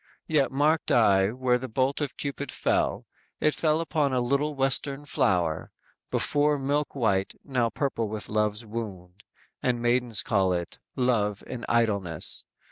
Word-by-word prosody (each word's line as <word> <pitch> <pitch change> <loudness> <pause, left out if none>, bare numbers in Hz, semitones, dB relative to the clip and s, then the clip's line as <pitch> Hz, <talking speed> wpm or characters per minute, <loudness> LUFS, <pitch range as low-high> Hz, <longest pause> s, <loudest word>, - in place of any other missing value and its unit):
Yet 145 -4 +2
marked 150 +4 +2
I 100 -4 +5
where 125 +1 +1
the 130 +1 -6
bolt 130 +5 0
of 140 -4 -3
Cupid 140 -1 -4
fell; - - 0 0.3
It 155 - +3
fell 155 -1 +2
upon 150 -4 0
a 130 - +2
little 140 +4 0
Western 135 +1 0
flower 85 - 0 0.4
Before 145 0 +2
milk 145 +2 -1
white; 100 -7 +1
now 125 -5 0
purple 115 -2 -1
with 105 0 -4
love's 105 +1 0
wound 100 -4 -7 0.4
And 125 -1 +1
maidens 120 -3 +1
call 95 -3 +2
it 85 -1 -4 0.2
'love 105 -5 +1
in 125 -2 -6
idleness.' 100 -9 0
125 Hz, 145 wpm, -27 LUFS, 105-140 Hz, 0.4 s, I